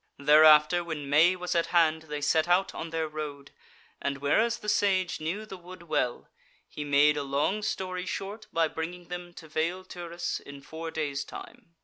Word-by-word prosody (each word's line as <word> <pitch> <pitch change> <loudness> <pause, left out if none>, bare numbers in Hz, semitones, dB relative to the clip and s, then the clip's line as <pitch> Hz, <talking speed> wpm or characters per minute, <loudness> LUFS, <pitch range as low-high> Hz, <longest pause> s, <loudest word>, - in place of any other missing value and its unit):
Thereafter 150 +3 +6
when 150 -4 -5
May 165 +5 +5
was 180 0 -3
at 170 -1 +1
hand 160 -2 +2
they 150 0 -4
set 155 +3 +2
out 180 +2 +2
on 165 - -5
their 160 -1 -2
road, 150 -2 -7 0.5
and 140 0 -2
whereas 215 +12 +2
the 210 - -10
Sage 190 -3 +1
knew 185 +8 -3
the 190 -3 -9
wood 180 0 -12
well, 150 -7 -1 0.4
he 150 - -6
made 145 +1 +4
a - - 0
long 140 +9 0
story 185 -3 -3
short 210 +4 -5
by 165 -1 +2
bringing 170 +3 -6
them 175 0 -6
to 160 - -11
Vale 170 +4 -2
Turris 175 -1 -5
in 140 0 -11
four 160 +2 -7
days' 150 -3 -3
time. 225 -9 -12
165 Hz, 185 wpm, -28 LUFS, 150-180 Hz, 0.5 s, Thereafter